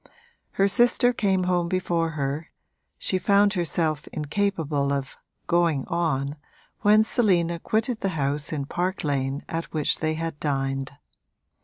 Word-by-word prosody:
Her 195 - +3
sister 240 +4 +4
came 195 -5 +1
home 180 -1 +1
before 175 -3 0
her 140 +3 -2 0.5
she 185 - -1
found 200 +2 +4
herself 160 -4 -1
incapable 150 -3 -1
of 140 -1 -3 0.3
'going 170 -6 +2
on' 145 -4 -1 0.4
when 215 +1 +5
Selina 175 -8 +1
quitted 220 +5 0
the 195 - 0
house 145 +1 -1
in 145 -3 -2
Park 180 +5 -2
Lane 140 -1 -1
at 165 +1 -3
which 155 -3 +1
they 155 0 0
had 165 -2 -4
dined. 135 -1 -2
165 Hz, 135 wpm, -25 LUFS, 145-190 Hz, 0.5 s, when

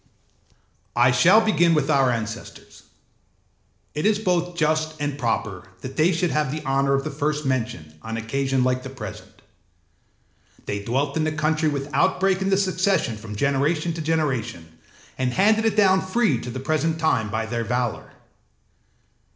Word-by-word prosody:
âI 120 +1 +4
shall 185 - +6
begin 175 -6 +3
with 150 -3 +1
our 135 -4 +3
ancestors: 115 -3 -6 1.1
it 150 - -3
is 210 0 +3
both 180 -4 -1
just 155 -1 0
and 145 -1 -2
proper 110 -6 -2
that 130 +1 -7
they 160 +3 +3
should 170 0 0
have 150 -3 0
the 155 0 -5
honour 135 +1 +2
of 135 - -1
the 155 - -4
first 150 +1 -2
mention 115 - -2
on 115 0 -5
an 115 - -4
occasion 135 +2 0
like 130 0 +1
the 135 - -8
present. 115 -7 -10 1.2
They 100 0 -4
dwelt 140 +6 -1
in 160 - +1
the 155 - 0
country 155 +1 0
without 145 0 0
break 190 0 +1
in 190 - 0
the 195 - +3
succession 185 - +1
from 105 0 -9
generation 145 +6 0
to 165 - -5
generation, 125 - -2 0.4
and 125 -1 0
handed 215 +4 +3
it 220 -2 +1
down 190 -3 +4
free 190 - +1
to - - -6
the 125 +2 -5
present 155 +3 0
time 125 -9 +1
by 110 +2 -2
their 115 +1 -3
valour. 120 0 -3
145 Hz, 165 wpm, -23 LUFS, 125-165 Hz, 1.2 s, shall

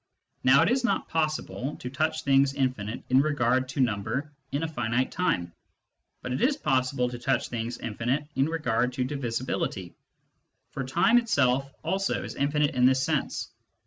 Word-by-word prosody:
Now 135 +4 +6
it 175 - +2
is 255 +1 +1
not 240 - 0
possible 155 -3 -2
to - - -8
touch 155 +3 -1
things 135 0 +3
infinite 130 -6 -2
in 130 +1 +6
regard 130 -3 +1
to 135 - -5
number 120 +4 0 0.2
in 145 +3 -1
a - - 0
finite 120 -3 -1
time, 90 - -1 0.7
but 125 - -3
it 130 - -2
is 280 +3 +3
possible 130 - +1
to 120 -1 -7
touch 130 +2 0
things 120 0 -4
infinite 120 +6 -2
in 135 +2 +2
regard 125 -6 0
to 125 - -1
divisibility: 125 -8 -3 0.8
for 135 - -4
time 230 - +4
itself 135 - +1
also 195 +1 -1
is - - -6
infinite 150 +2 +1
in 125 -1 +4
this 130 0 +3
sense. - - -2
130 Hz, 165 wpm, -27 LUFS, 125-150 Hz, 0.8 s, Now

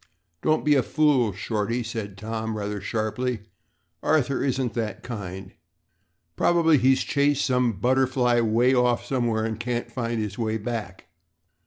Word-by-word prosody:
"Don't 155 0 +1
be 150 - +5
a 135 - +4
fool, 140 -6 +2
Shorty," 110 +4 -2
said 110 -4 -5
Tom, 110 +1 -4
rather 105 -1 -4
sharply. 110 +3 -2 0.6
"Arthur 140 -4 +1
isn't 130 -3 -1
that 110 -3 -3
kind. 95 -5 -6 0.8
Probably 165 - +4
he's 130 +2 +3
chased 145 0 +1
some 125 -3 +2
butterfly 125 +2 +2
way 115 +3 +3
off 125 -1 +2
somewhere 120 -4 0
and 110 -1 -3
can't 120 +1 -3
find 115 -2 -2
his 105 -1 -4
way 110 -1 0
back." 105 -5 -5
120 Hz, 140 wpm, -25 LUFS, 110-130 Hz, 0.8 s, be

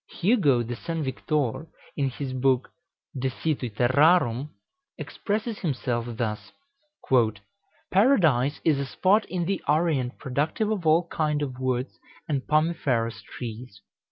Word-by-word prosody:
Hugo 170 - +3
de 120 +1 -5
St. 165 +3 -4
Victor, 145 +1 -2 0.3
in 140 -2 0
his 130 0 -5
book 130 0 +1 0.4
"De 130 0 -1
Situ 135 -2 -2
Terrarum," 130 - +3 0.5
expresses 210 - -3
himself 125 -7 -2
thus: 110 -3 -3 1.4
"Paradise 165 - +3
is 155 -4 +3
a 140 - -1
spot 200 +9 +2
in 175 -2 -2
the 195 +1 -1
Orient 150 -5 +1
productive 150 - -1
of 190 -7 -2
all 165 +2 +4
kind 150 -2 0
of 130 -3 -5
woods 130 0 -2 0.3
and 140 -4 0
pomiferous 150 -7 +1
trees. 115 -3 -8
145 Hz, 125 wpm, -26 LUFS, 125-165 Hz, 1.4 s, all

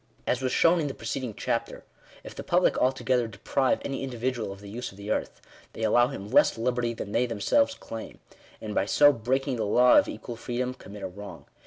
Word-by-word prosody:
As 125 - 0
was 130 -1 -1
shown 170 +1 +4
in 150 - -1
the 135 - -5
preceding 125 -6 -4
chapter, - - -3 0.4
if - - -9
the - - -7
public - - +2
altogether 130 -2 +1
deprive 130 +5 0
any 135 - -3
individual 125 -4 -3
of 100 - -9
the 100 - -12
use 120 +5 -6
of 95 - -17
the 100 +1 -5
earth, - - -3 0.3
they 110 - -6
allow 120 +3 +4
him 125 -7 -7
less - - +4
liberty 120 0 -1
than 100 - -6
they 125 +4 +1
themselves 280 - +1
claim; 115 -1 -8 0.4
and 105 -1 -6
by 100 - 0
so 145 +4 +6
breaking 130 +3 -1
the 110 - -1
law 125 +4 +6
of - - 0
equal 120 -2 -7
freedom, 125 +2 -3
commit 105 -5 -11
a - - -2
wrong. 90 -6 -10
120 Hz, 210 wpm, -27 LUFS, 105-130 Hz, 0.4 s, so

